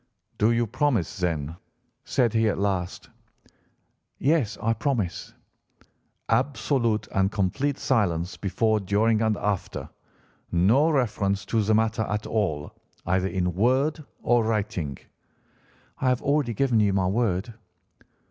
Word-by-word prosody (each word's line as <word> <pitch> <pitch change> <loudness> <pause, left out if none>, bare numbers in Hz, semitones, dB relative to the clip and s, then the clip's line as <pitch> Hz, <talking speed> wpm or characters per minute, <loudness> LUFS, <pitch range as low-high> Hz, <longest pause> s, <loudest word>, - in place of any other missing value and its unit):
"'Do 105 - +4
you 120 0 +2
promise, 120 - 0
then?' 80 -4 -2 0.5
said 120 -5 +1
he 110 -1 +3
at - - -1
last. 95 -3 -2 1.1
"'Yes, 135 -7 +1
I 115 +1 +1
promise.' 110 -6 -2 0.9
"'Absolute 120 -2 +1
and 95 +1 +1
complete 130 +9 0
silence 90 -8 0
before, 110 +2 +1
during, 105 +3 +2
and 110 -2 +1
after? 100 -2 -3 0.6
No 110 - +4
reference 105 - 0
to 115 - +1
the 110 +1 +2
matter 110 +1 +1
at 105 +1 -2
all, 85 -10 -1 0.3
either 95 +2 +1
in 90 -2 -1
word 130 - +1 0.2
or 120 -1 +3
writing?' 105 -10 -2 1.0
"'I 130 - +2
have 125 -1 +1
already 140 -5 +1
given 125 -1 +2
you 100 -2 +3
my 95 -1 +1
word. 105 +1 0
110 Hz, 125 wpm, -25 LUFS, 95-120 Hz, 1.1 s, Do